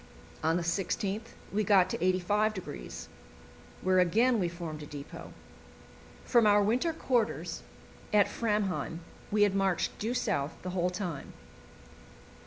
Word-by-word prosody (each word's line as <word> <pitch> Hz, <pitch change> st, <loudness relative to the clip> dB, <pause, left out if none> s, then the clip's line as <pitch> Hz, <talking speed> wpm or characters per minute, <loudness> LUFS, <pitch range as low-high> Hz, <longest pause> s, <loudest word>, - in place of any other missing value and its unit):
On 160 Hz, +2 st, +3 dB
the 175 Hz, -, -1 dB
16th 200 Hz, +5 st, -2 dB, 0.2 s
we 215 Hz, +1 st, +2 dB
got 190 Hz, -2 st, +5 dB
to -, -, -1 dB
85°, 185 Hz, -, -1 dB, 0.8 s
where 185 Hz, 0 st, +4 dB
again 225 Hz, +7 st, +4 dB
we 175 Hz, -3 st, +1 dB
formed 170 Hz, -3 st, -6 dB
a 150 Hz, -, -8 dB
depot. 145 Hz, -1 st, -9 dB, 0.9 s
From 235 Hz, -3 st, +4 dB
our 205 Hz, 0 st, +5 dB
winter 245 Hz, +11 st, +2 dB
quarters 245 Hz, -8 st, -1 dB, 0.5 s
at 210 Hz, -2 st, +6 dB
Framheim 205 Hz, -6 st, -1 dB, 0.3 s
we 210 Hz, 0 st, +3 dB
had 205 Hz, -2 st, +3 dB
marched 195 Hz, -2 st, +1 dB
due 230 Hz, +4 st, -1 dB
south 165 Hz, -, -1 dB
the 185 Hz, -, -3 dB
whole 180 Hz, -1 st, +1 dB
time. 180 Hz, -6 st, -5 dB
195 Hz, 130 wpm, -30 LUFS, 175-215 Hz, 0.9 s, at